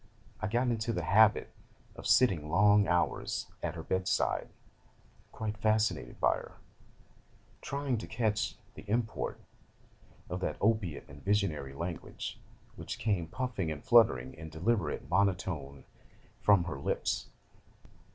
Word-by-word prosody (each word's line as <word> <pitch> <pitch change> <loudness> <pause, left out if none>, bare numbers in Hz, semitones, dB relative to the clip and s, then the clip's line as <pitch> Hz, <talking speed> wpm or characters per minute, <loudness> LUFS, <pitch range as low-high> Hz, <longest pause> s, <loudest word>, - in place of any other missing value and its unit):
I 110 - 0
got 120 +4 +1
into 115 0 -1
the - - -2
habit 110 +1 +4 0.4
of - - -6
sitting 90 -12 +4
long 105 +4 +5
hours 90 -1 0 0.2
at 85 -1 -3
her 80 - -6
bed 95 +2 -1
side, - - +1 0.8
quite 110 -1 -4
fascinated 110 +1 0
by - - +3
her, - - -10 1.1
trying 140 -4 -2
to - - -7
catch 110 -2 0 0.2
the - - -10
import 115 +1 -1 0.9
of 90 - -4
that 95 - -2
opiate 100 -8 0
and 70 +1 -13
visionary 95 -9 0
language 85 +3 -5 0.4
which - - -5
came 100 -7 0
puffing 105 -4 -2
and 75 -2 -6
fluttering 65 - +5
in 80 +1 -9
deliberate 85 +1 -1
monotone 90 -7 0 0.6
from 100 -4 +5
her 80 -6 -5
lips. - - -1
100 Hz, 130 wpm, -31 LUFS, 80-110 Hz, 1.1 s, long